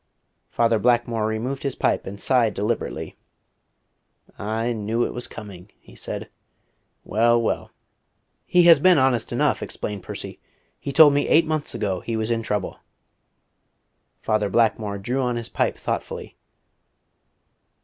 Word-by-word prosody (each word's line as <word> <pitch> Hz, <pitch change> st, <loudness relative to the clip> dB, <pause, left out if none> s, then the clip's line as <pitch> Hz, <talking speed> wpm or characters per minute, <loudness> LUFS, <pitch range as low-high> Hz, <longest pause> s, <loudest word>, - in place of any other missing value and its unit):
Father 115 Hz, -1 st, +2 dB
Blackmore 120 Hz, -1 st, +1 dB
removed 120 Hz, +5 st, -3 dB
his 140 Hz, -2 st, -2 dB
pipe -, -, 0 dB
and 100 Hz, +1 st, -7 dB
sighed 120 Hz, -4 st, +2 dB
deliberately. 105 Hz, +4 st, -3 dB, 1.2 s
"I 115 Hz, +3 st, -1 dB
knew 110 Hz, +2 st, -1 dB
it -, -, -4 dB
was 125 Hz, -, -5 dB
coming," 100 Hz, -3 st, -10 dB
he -, -, -18 dB
said. -, -, -5 dB, 0.8 s
"Well, 120 Hz, +2 st, +3 dB
well." 115 Hz, -, -2 dB, 0.8 s
"He 180 Hz, -1 st, +5 dB
has 170 Hz, -3 st, +8 dB
been 180 Hz, +2 st, +5 dB
honest 130 Hz, -3 st, +2 dB
enough," -, -, +1 dB
explained 105 Hz, -2 st, -5 dB
Percy. -, -, -7 dB, 0.4 s
"He 140 Hz, -, -5 dB
told 145 Hz, +1 st, +7 dB
me 145 Hz, -, +1 dB
eight 165 Hz, +1 st, +5 dB
months 155 Hz, -5 st, -2 dB
ago 100 Hz, -5 st, -1 dB
he 115 Hz, +5 st, -4 dB
was 110 Hz, +1 st, -1 dB
in 115 Hz, -1 st, 0 dB
trouble." 105 Hz, -3 st, -3 dB, 1.4 s
Father 110 Hz, -2 st, +1 dB
Blackmore 105 Hz, -1 st, +1 dB
drew 120 Hz, +7 st, -2 dB
upon 125 Hz, -2 st, 0 dB
his 120 Hz, -1 st, -5 dB
pipe -, -, -1 dB
thoughtfully. -, -, -5 dB
115 Hz, 140 wpm, -23 LUFS, 105-130 Hz, 1.4 s, has